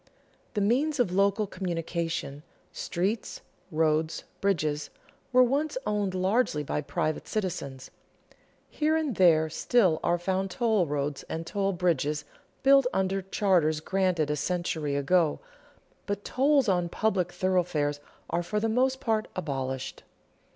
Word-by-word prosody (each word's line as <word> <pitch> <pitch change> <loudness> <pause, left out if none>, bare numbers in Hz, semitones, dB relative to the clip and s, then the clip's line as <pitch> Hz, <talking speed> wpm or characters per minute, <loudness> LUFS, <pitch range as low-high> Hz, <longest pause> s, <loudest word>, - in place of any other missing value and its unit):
The 205 - +1
means 275 +8 +1
of 240 -8 +2
local 200 +3 +2
communication 170 -5 -3 0.3
streets, 195 +6 -2 0.3
roads, 155 -1 +1 0.2
bridges 155 -7 0 0.4
were 255 0 +6
once 280 +4 0
owned 205 -3 -1
largely 185 -4 +1
by 145 - -2
private 155 +1 -2
citizens. 140 -10 -4 0.8
Here 310 +1 +1
and 305 -5 -1
there 160 -4 +5
still 180 0 +2
are 175 - +2
found 190 +2 -1
toll 215 -3 +1
roads 145 0 -2
and 165 +1 -4
toll 195 +1 -1
bridges 165 -4 0 0.4
built 275 -1 +6
under 190 0 0
charters 185 -5 +2
granted 180 -3 0
a - - +1
century 155 -2 -2
ago, 155 +2 +2 0.7
but 205 0 -3
tolls 275 -1 +3
on 175 -3 +1
public 190 -3 0
thoroughfares 175 -5 0 0.3
are 170 - 0
for 210 +5 -2
the 225 - 0
most 260 +4 +1
part 220 -4 0
abolished. 130 -3 -4
185 Hz, 130 wpm, -28 LUFS, 155-215 Hz, 0.8 s, were